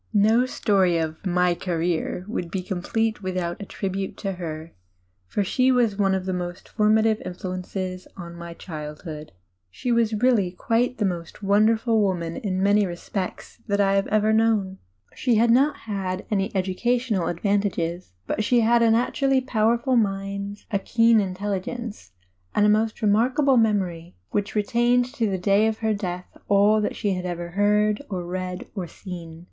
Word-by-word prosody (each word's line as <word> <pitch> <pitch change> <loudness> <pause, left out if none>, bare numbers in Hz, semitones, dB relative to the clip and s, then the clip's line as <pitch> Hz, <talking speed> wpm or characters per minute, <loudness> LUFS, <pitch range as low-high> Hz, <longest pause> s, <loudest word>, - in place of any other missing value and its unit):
No 220 +5 +4
story 190 -8 +2
of 160 -1 -3
my 180 0 +2
"career" 175 0 -2
would 180 -5 -3
be 185 +1 -3
complete 215 +4 -1
without 185 -1 -3
a 200 - -7
tribute 195 -1 -4
to 195 - -3
her, 165 -3 -6 0.5
for 205 - 0
she 255 +6 +2
was 240 -5 +2
one 195 -1 +2
of 185 -1 -3
the 180 -1 -3
formative 220 0 +3
influences 185 0 -5
of 170 -2 -8
my 170 0 -8
childhood. 150 -1 -8 0.4
She 240 - -3
was 230 -2 +2
really 220 -4 +3
quite 240 +6 0
the 210 - 0
most 175 +1 -4
wonderful 220 +3 +3
D,i„Mb, 220 - +4
Google 205 - +3
woman 170 -3 -3
in 190 -6 -2
many 205 +1 +4
respects 185 +2 -5
that 200 -1 0
I 195 -1 +3
have 195 0 +1
ever 215 0 +2
known. 215 -4 +1 0.3
She 245 -3 +1
had 230 +2 +4
never 275 +5 +4
had 195 -3 -4
any 195 -1 0
educational 200 +2 0
advantages. 180 - -1
But 215 - -1
she 240 +2 +3
had 235 +1 +4
a 230 - +5
natu 235 +5 +1
rally 270 -1 +3
powerful 235 +1 +1
mind, 200 -1 -2
a 200 - +1
keen 230 +2 +4
intelligence, 205 - -4 0.4
and 210 - +4
a - - +5
most 220 +2 +1
re - - +3
markable 255 +6 +3
memory 190 -7 0 0.2
which 205 +1 -2
retained 240 +3 +2
to 230 -6 0
the 190 - -1
day 200 +4 +3
of 220 -1 -1
her 220 -1 0
death 180 -3 -4 0.2
all 205 +2 +4
that 210 - -2
she 205 -3 -1
had 180 0 -3
ever 175 -1 -4
heard 210 +3 +2
or 180 -3 -3
read 185 +1 -4
or 190 -5 -4
seen. 170 -3 -9
200 Hz, 170 wpm, -24 LUFS, 180-220 Hz, 0.5 s, a